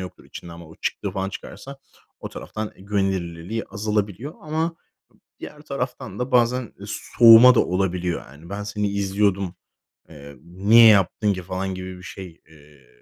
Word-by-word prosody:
yoktur 90 Hz, -1 st, -9 dB
içinde" 85 Hz, -, -10 dB
ama 85 Hz, -1 st, -11 dB
o 80 Hz, -, -14 dB
çıktığı -, -, -3 dB
falan 95 Hz, 0 st, -3 dB
çıkarsa 135 Hz, +7 st, -10 dB, 0.4 s
o -, -, -6 dB
taraftan 110 Hz, 0 st, -7 dB
güvenilirliliği 95 Hz, 0 st, -2 dB
azalabiliyor 105 Hz, -, -3 dB
ama 160 Hz, +2 st, -2 dB, 0.6 s
diğer 150 Hz, -, -9 dB
taraftan 130 Hz, -4 st, -5 dB
da 125 Hz, +2 st, -3 dB
bazen 125 Hz, 0 st, +2 dB
soğuma 115 Hz, +3 st, +7 dB
da -, -, +4 dB
olabiliyor. 90 Hz, -2 st, -1 dB
Hani 75 Hz, +5 st, -15 dB
"ben 100 Hz, +1 st, -4 dB
seni 105 Hz, 0 st, -2 dB
izliyordum, 100 Hz, -2 st, 0 dB, 0.6 s
eee, 70 Hz, -3 st, -12 dB
niye 100 Hz, +7 st, +5 dB
yaptın 100 Hz, 0 st, +3 dB
ki" 95 Hz, -, -5 dB
falan 95 Hz, +1 st, -4 dB
gibi 95 Hz, 0 st, -7 dB
bir 90 Hz, -, -14 dB
şey, 90 Hz, -2 st, -10 dB
eee, 75 Hz, -3 st, -20 dB
100 Hz, 150 wpm, -23 LUFS, 90-115 Hz, 0.6 s, soğuma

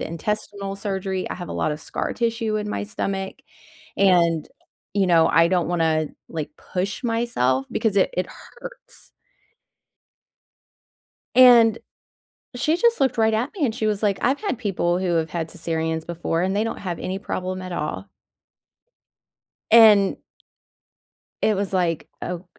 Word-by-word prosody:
intestinal 200 Hz, +3 st, -4 dB
surgery. 190 Hz, -2 st, -3 dB
I -, -, -4 dB
have 175 Hz, -1 st, -8 dB
a -, -, -5 dB
lot 155 Hz, -, -1 dB
of 150 Hz, -, -7 dB
scar -, -, -4 dB
tissue 230 Hz, -2 st, -1 dB
in 210 Hz, 0 st, -3 dB
my -, -, -3 dB
stomach, 195 Hz, -2 st, -4 dB, 0.6 s
and, 170 Hz, -5 st, +3 dB, 0.5 s
you 195 Hz, -2 st, +2 dB
know, 165 Hz, -2 st, +5 dB
I 165 Hz, 0 st, +4 dB
don't 175 Hz, -2 st, +1 dB
wanna, 160 Hz, -3 st, +1 dB, 0.2 s
like, 155 Hz, -3 st, -4 dB
push 195 Hz, +6 st, -4 dB
myself 180 Hz, -, 0 dB
because 220 Hz, -3 st, 0 dB
it 190 Hz, -, +3 dB
it 180 Hz, -, 0 dB
hurts. -, -, -11 dB, 2.2 s
And 235 Hz, -3 st, +7 dB, 0.8 s
she 310 Hz, +6 st, +1 dB
just 470 Hz, -1 st, +3 dB
looked 265 Hz, -3 st, +1 dB
right 220 Hz, -1 st, +3 dB
at 240 Hz, +7 st, -1 dB
me, 310 Hz, -, +2 dB
and 225 Hz, -4 st, -2 dB
she 225 Hz, -, -2 dB
was 210 Hz, -1 st, -1 dB
like, 205 Hz, -3 st, +1 dB
"I've 265 Hz, +4 st, +1 dB
had 400 Hz, -, -2 dB
people 180 Hz, -5 st, 0 dB
who 180 Hz, -2 st, 0 dB
have 160 Hz, 0 st, 0 dB
had 165 Hz, -2 st, -3 dB
cesareans 160 Hz, 0 st, -3 dB
before, 170 Hz, -1 st, -2 dB
and 190 Hz, +2 st, 0 dB
they 210 Hz, -, +1 dB
don't 225 Hz, -, -3 dB
have 175 Hz, -3 st, -4 dB
any 190 Hz, +1 st, -4 dB
problem 185 Hz, -2 st, -4 dB
at 185 Hz, 0 st, -7 dB
all." 170 Hz, +5 st, -4 dB, 1.6 s
And 215 Hz, -4 st, +7 dB, 1.3 s
it 215 Hz, -, +3 dB
was 200 Hz, 0 st, -2 dB
like, 175 Hz, -4 st, 0 dB
ok 180 Hz, 0 st, -4 dB
195 Hz, 150 wpm, -23 LUFS, 170-220 Hz, 2.2 s, And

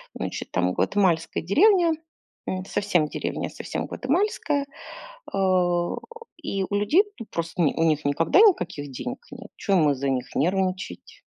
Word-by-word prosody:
значит, -, -, -5 dB
там 90 Hz, 0 st, +1 dB
гватемальская 180 Hz, -5 st, +1 dB
деревня. 345 Hz, -, +4 dB, 0.6 s
М. 185 Hz, 0 st, -2 dB
Совсем 195 Hz, -6 st, +1 dB
деревня, -, -, -3 dB
совсем -, -, -5 dB
гватемальская. 295 Hz, -1 st, 0 dB, 0.7 s
А. 180 Hz, -3 st, +1 dB, 0.5 s
И 195 Hz, -1 st, -2 dB
у 205 Hz, -, -3 dB
людей, 250 Hz, -, +4 dB, 0.2 s
ну, 230 Hz, -, -6 dB
просто 170 Hz, +1 st, -2 dB
у -, -, +4 dB
ни 145 Hz, -, +3 dB
у 165 Hz, -, +1 dB
них 155 Hz, -2 st, +1 dB
никогда 160 Hz, -, +3 dB
никаких 180 Hz, -, +3 dB
денег 130 Hz, -, -5 dB
нет, -, -, -11 dB
чё 200 Hz, -, 0 dB
им 155 Hz, -2 st, +4 dB
из-за 140 Hz, 0 st, -1 dB
них 125 Hz, -1 st, -3 dB
нервничать? 185 Hz, -, -2 dB
185 Hz, 150 wpm, -25 LUFS, 160-205 Hz, 0.7 s, деревня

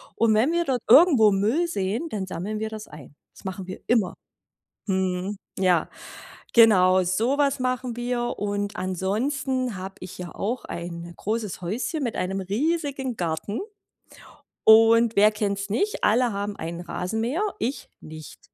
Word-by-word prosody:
Und 230 Hz, -1 st, +3 dB
wenn 225 Hz, +8 st, +3 dB
wir 340 Hz, 0 st, +1 dB
dort 255 Hz, -5 st, -1 dB
irgendwo 265 Hz, -, +7 dB
Müll 225 Hz, -, +1 dB
sehen, 225 Hz, -, -2 dB
dann 195 Hz, -3 st, -4 dB
sammeln 200 Hz, +5 st, -4 dB
wir 220 Hz, -, -2 dB
das 215 Hz, -1 st, -8 dB
ein. 145 Hz, -2 st, -13 dB, 0.2 s
Das -, -, -18 dB
machen 190 Hz, 0 st, -5 dB
wir 185 Hz, -, -7 dB
immer. 220 Hz, -7 st, +2 dB, 0.7 s
Mhm. 190 Hz, 0 st, -1 dB, 0.2 s
Ja. 180 Hz, -4 st, +2 dB, 0.7 s
Genau, 185 Hz, -5 st, +6 dB
so 225 Hz, +10 st, 0 dB
was 280 Hz, -2 st, +1 dB
machen 255 Hz, -1 st, -2 dB
wir. 240 Hz, 0 st, -2 dB
Und 205 Hz, 0 st, -2 dB
ansonsten 235 Hz, -, -2 dB
habe 190 Hz, +1 st, -7 dB
ich 185 Hz, -, -9 dB
ja 180 Hz, -1 st, -7 dB
auch 240 Hz, +5 st, -3 dB
ein 170 Hz, 0 st, -6 dB
großes 215 Hz, -3 st, -3 dB
Häuschen 245 Hz, -, -3 dB
mit 235 Hz, -, -3 dB
einem 190 Hz, +1 st, -2 dB
riesigen 270 Hz, -, -2 dB
Garten. 170 Hz, +4 st, -3 dB, 1.1 s
Und 225 Hz, +1 st, +6 dB
wer 210 Hz, +2 st, +6 dB
kennt's 200 Hz, -1 st, -2 dB
nicht? 405 Hz, -, -1 dB
Alle 240 Hz, +2 st, +3 dB
haben 200 Hz, +1 st, -3 dB
einen 170 Hz, +1 st, -5 dB
Rasenmäher, 225 Hz, -, -2 dB, 0.2 s
ich 250 Hz, +6 st, -3 dB
nicht. 155 Hz, -1 st, -11 dB
215 Hz, 150 wpm, -25 LUFS, 185-245 Hz, 1.1 s, irgendwo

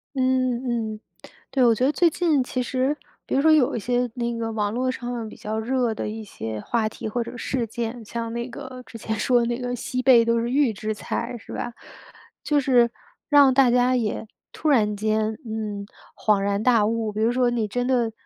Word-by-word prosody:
嗯， 255 Hz, -3 st, 0 dB
嗯。 215 Hz, -, -13 dB, 0.5 s
对， 265 Hz, -, +2 dB
我 235 Hz, -, +6 dB
觉 235 Hz, -, -1 dB
得 280 Hz, -, +3 dB
最 345 Hz, +3 st, +3 dB
近 315 Hz, -5 st, +1 dB
其 250 Hz, 0 st, -2 dB
实 260 Hz, +3 st, 0 dB, 0.3 s
比 -, -, -4 dB
如 270 Hz, -, +3 dB
说 315 Hz, +2 st, +5 dB
有 300 Hz, -5 st, +4 dB
一 -, -, -1 dB
些 245 Hz, +2 st, 0 dB
那 235 Hz, -1 st, -2 dB
个 225 Hz, 0 st, -2 dB
网 210 Hz, -2 st, -1 dB
络 255 Hz, +1 st, 0 dB
上 245 Hz, -1 st, -6 dB
面 235 Hz, -2 st, -4 dB
比 -, -, -10 dB
较 220 Hz, +1 st, -4 dB
热 245 Hz, 0 st, 0 dB
的 -, -, -3 dB
一 220 Hz, +1 st, -5 dB
些 110 Hz, -, -6 dB
话 225 Hz, -2 st, 0 dB
题 215 Hz, -, -6 dB
或 240 Hz, +2 st, -1 dB
者 245 Hz, -, -9 dB
事 250 Hz, -2 st, -1 dB
件， 230 Hz, +1 st, -5 dB
像 230 Hz, +1 st, -4 dB
那 235 Hz, +1 st, -3 dB
个 255 Hz, 0 st, -9 dB
之 230 Hz, -, -10 dB
前 220 Hz, 0 st, -3 dB
说 240 Hz, +2 st, +3 dB
那 240 Hz, 0 st, -1 dB
个 245 Hz, 0 st, -3 dB
西 255 Hz, +1 st, -3 dB
贝 245 Hz, -3 st, +7 dB
都 230 Hz, 0 st, +2 dB
是 235 Hz, +1 st, -2 dB
预 275 Hz, -3 st, +3 dB
制 215 Hz, +1 st, -3 dB
菜， 235 Hz, +3 st, -4 dB
是 -, -, -13 dB
吧， 240 Hz, -, -4 dB, 0.7 s
就 295 Hz, -2 st, +2 dB
是 245 Hz, -3 st, +4 dB, 0.4 s
让 285 Hz, -3 st, +7 dB
大 255 Hz, -2 st, +5 dB
家 250 Hz, +1 st, +3 dB
也 225 Hz, -2 st, -2 dB, 0.2 s
突 310 Hz, -, -2 dB
然 210 Hz, -7 st, +3 dB
间， 215 Hz, +1 st, 0 dB
嗯， 215 Hz, -2 st, -4 dB, 0.3 s
恍 210 Hz, -2 st, +2 dB
然 200 Hz, +1 st, 0 dB
大 230 Hz, -3 st, +4 dB
悟。 225 Hz, -1 st, -1 dB
比 210 Hz, -, -5 dB
如 230 Hz, -, +3 dB
说 245 Hz, 0 st, +2 dB
你 230 Hz, -3 st, -1 dB
真 245 Hz, +4 st, -2 dB
的 240 Hz, -3 st, +2 dB
235 Hz, 235 characters per minute, -24 LUFS, 220-255 Hz, 0.7 s, 贝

